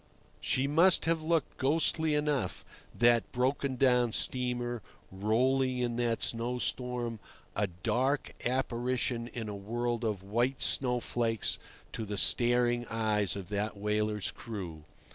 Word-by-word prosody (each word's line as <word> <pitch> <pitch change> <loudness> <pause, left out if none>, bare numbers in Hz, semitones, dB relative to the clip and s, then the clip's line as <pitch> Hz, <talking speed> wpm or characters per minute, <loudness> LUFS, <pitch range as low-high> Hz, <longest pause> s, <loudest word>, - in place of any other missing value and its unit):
She 130 - +1
must 165 +6 +4
have 165 -1 +2
looked 160 -2 0
ghostly 155 +2 +1
enough, 150 -2 -1 0.3
that 120 -1 +3
broken 130 +2 0
down 125 -3 +3
steamer, 120 -2 -1 0.3
rolling 125 +6 +1
in 120 -1 -1
that 120 -1 0
snowstorm—a 120 -3 -2 0.2
dark 135 +3 0
apparition 125 -1 -1
in 115 -2 -6
a 105 - -4
world 120 +4 -2
of 105 -4 -2
white 120 +7 0
snowflakes 120 -3 +1 0.3
to 110 - -4
the 105 -1 -4
staring 120 +1 +3
eyes 105 -4 0
of 100 -2 -7
that 105 0 -2
whaler's 105 0 0
crew. 90 -9 -7
120 Hz, 120 wpm, -31 LUFS, 110-130 Hz, 0.3 s, must